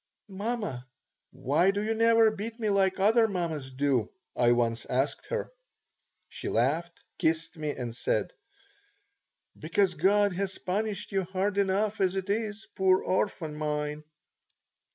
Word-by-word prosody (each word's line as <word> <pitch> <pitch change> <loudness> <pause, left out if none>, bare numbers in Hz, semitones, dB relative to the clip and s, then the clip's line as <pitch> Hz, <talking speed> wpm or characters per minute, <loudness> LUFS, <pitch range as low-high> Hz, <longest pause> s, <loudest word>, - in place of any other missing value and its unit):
"Mamma, 200 - -3 0.4
why 145 +8 +1
do 200 +1 0
you 220 +1 0
never 225 0 +5
beat 220 +3 -6
me 215 -2 0
like 195 -1 +2
other 225 +3 +5
mammas 165 -8 -3
do?" 130 -4 0 0.2
I 120 -1 +4
once 115 -1 0
asked 135 +3 -1
her. 475 -1 -3 0.8
She - - -6
laughed, 155 +9 0 0.2
kissed 165 +2 0
me, 155 -2 -3
and 120 -3 -5
said, - - -1 1.2
"Because 195 -3 +1
God 200 +4 +3
has 195 +1 -3
punished 205 +1 -3
you 195 -2 0
hard 195 +2 -1
enough 200 +2 +1
as 190 0 +2
it 190 +1 -2
is, 215 0 -2
poor 190 -1 +3
orphan 180 -5 -1
mine." 150 0 -3
190 Hz, 135 wpm, -28 LUFS, 150-205 Hz, 1.2 s, never